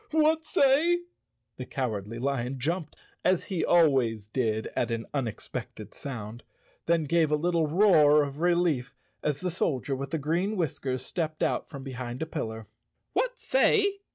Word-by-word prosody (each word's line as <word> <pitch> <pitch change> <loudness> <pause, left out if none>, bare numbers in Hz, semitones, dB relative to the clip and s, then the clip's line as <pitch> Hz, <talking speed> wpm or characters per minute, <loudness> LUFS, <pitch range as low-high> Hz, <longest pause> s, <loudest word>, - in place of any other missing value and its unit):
"What 315 +1 +3
say?" 315 +7 +3 0.6
The 130 - -5
Cowardly 115 -4 -3
Lion 135 0 -2
jumped, 155 +4 -2 0.3
as 185 -1 +2
he 185 -4 -2
al¬ 170 -3 +5
ways 115 -6 0
did 110 -1 -1
at - - 0
an 115 -1 -2
unexpected 125 -7 -5
sound, 115 -4 -7 0.5
then 165 -1 +3
gave 160 +1 +2
a - - +4
little 165 0 +1
roar 150 -4 +5
of 140 0 -6
relief 170 -7 +1 0.3
as 150 -2 -1
the 180 - -1
Soldier 140 -5 -1
with 135 +1 -5
the 160 - -1
Green 170 +8 -1
Whiskers 130 -6 -2
stepped 155 -1 -2
out - - 0
from 140 -2 -8
behind 125 0 -5
a - - -2
pillar. 110 -7 -5 0.5
"What - - 0
say?" 405 -6 +2
150 Hz, 155 wpm, -28 LUFS, 125-175 Hz, 0.6 s, al¬